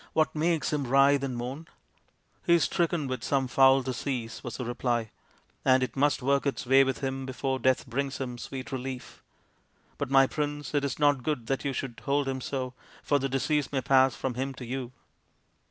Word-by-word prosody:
" - - -37
What 155 -1 +2
makes 160 0 0
him 145 -3 -1
writhe 135 +2 +5
and 130 -3 -3
moan? 130 +7 -5 0.3
" - - -39
" - - -39
He 170 - +6
is 170 - +3
stricken 170 -3 0
with 130 -3 -4
some 135 -2 +1
foul 135 +1 +5
disease, 125 -2 -3
55 - - -20
was 120 - -5
the 125 - -4
reply, 120 -2 -1 0.3
" - - -37
and 130 0 +4
it 125 -2 -4
must 145 -1 +2
work 140 +2 +2
its 140 - -2
way 135 +2 +6
with 135 +1 -2
him 135 -1 -3
before 130 0 -2
death 130 -1 +2
brings 135 +2 -2
him 125 -2 -5
sweet 130 +1 -7
relief. 130 -1 -6 0.8
But, 145 - -2
my 135 0 +6
Prince, 145 +1 -3
it 145 -1 +1
is 140 - -2
not 145 -3 +3
good 130 -3 -2
that 135 +3 -1
you 140 - -1
should 130 -2 -5
hold 140 0 +1
him 130 -1 -2
so, 130 -1 -3 0.3
for 145 - +2
the 135 0 -1
disease 145 +2 0
may 135 -2 0
pass 130 0 +4
from 130 - -3
him 135 +2 -3
to 125 - -8
you. 125 0 -4
135 Hz, 220 wpm, -28 LUFS, 130-140 Hz, 0.8 s, He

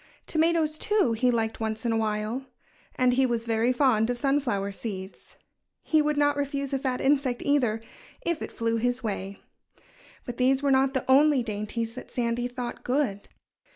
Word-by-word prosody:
Tomatoes, 320 -1 +1
too, 415 - +2
he 250 +3 +2
liked 225 -2 0
once 220 +1 -3
in 235 - +2
a - - +1
while. 220 +4 -2 0.5
And 250 -1 +3
he 260 +1 +3
was 235 -1 -2
very 230 +1 +2
fond 245 -4 +2
of 245 - -1
sunflower 240 -8 0
seeds. 195 -2 -7 0.5
He 310 -1 +3
would 300 0 0
not 290 0 +3
refuse 280 -1 -2
a 270 - +1
fat 260 -2 -1
insect, 270 -3 +1
either, 250 -7 +2 0.5
if 340 -2 -1
it - - -5
flew 230 0 -1
his 245 +2 -1
way. 200 -2 -4 0.8
But 245 - -6
these 265 +2 +2
were 280 - +3
not 265 +1 +3
the 260 - -1
only 275 0 +5
dainties 225 +1 -3
that 255 - -9
Sandy 240 0 -1
thought 245 -1 -6
good. 250 -7 -1
250 Hz, 175 wpm, -27 LUFS, 225-275 Hz, 0.8 s, only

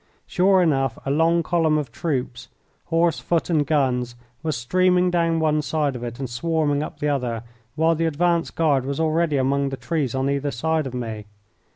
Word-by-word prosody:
Sure 185 0 +3
enough, 135 -6 +1
a 135 - 0
long 165 +3 +3
column 160 -2 +2
of 145 -6 -3
troops 125 -3 -3 0.4
horse, 165 -1 +1
foot, 170 0 -1
and 150 -3 +2
guns 125 -5 0 0.3
was 155 -4 -2
streaming 180 +8 +2
down 165 -1 +1
one 155 -1 +2
side 150 -2 -1
of 120 - -6
it 120 -1 -5
and 135 - -4
swarming 145 +3 0
up 150 -1 -6
the 150 - -1
other, 125 -6 -1 0.3
while 160 +1 +3
the 165 +1 -1
advance 170 +2 +1
guard 145 -5 +1
was 140 +2 -3
already 160 -1 +1
among 140 +1 +1
the 135 - -5
trees 145 -7 -2
on 130 +1 0
either 140 +1 0
side 155 +4 -1
of 130 - -7
me. 110 -4 -5
150 Hz, 190 wpm, -23 LUFS, 130-165 Hz, 0.4 s, Sure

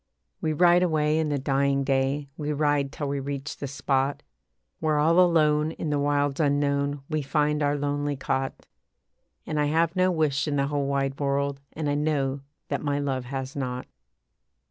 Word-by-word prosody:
We 155 - 0
ride 175 +3 +5
away 155 -3 +2
in 155 -1 0
the 145 - 0
dying 140 0 +1
day, 135 +1 0
We 150 -1 -2
ride 145 -2 +1
till 145 - -4
we 140 0 -1
reach 140 +1 -5
the 140 - -4
spot 140 0 -1 0.6
Where 155 -1 +1
all 165 +4 +4
alone 155 -3 +3
in 155 - -4
the 145 - +1
wilds 145 -1 +1
unknown 140 -1 +1
We 155 -1 -1
find 150 +1 +1
our 145 0 +1
lonely 145 0 -1
cot. 135 0 -3 0.8
And 150 - -2
I 150 - +3
have 165 +3 +1
no 185 0 +3
wish 155 -5 +1
in 145 - 0
the 140 -1 +2
whole 140 -1 -1
wide 135 -1 -1
world, 140 0 0
And 155 -1 -3
I 145 - +1
know 145 -2 0 0.3
that - - -1
my 145 -1 0
love 135 -3 -2
has 135 +1 -5
not. 125 -2 -3
145 Hz, 180 wpm, -26 LUFS, 140-150 Hz, 0.8 s, ride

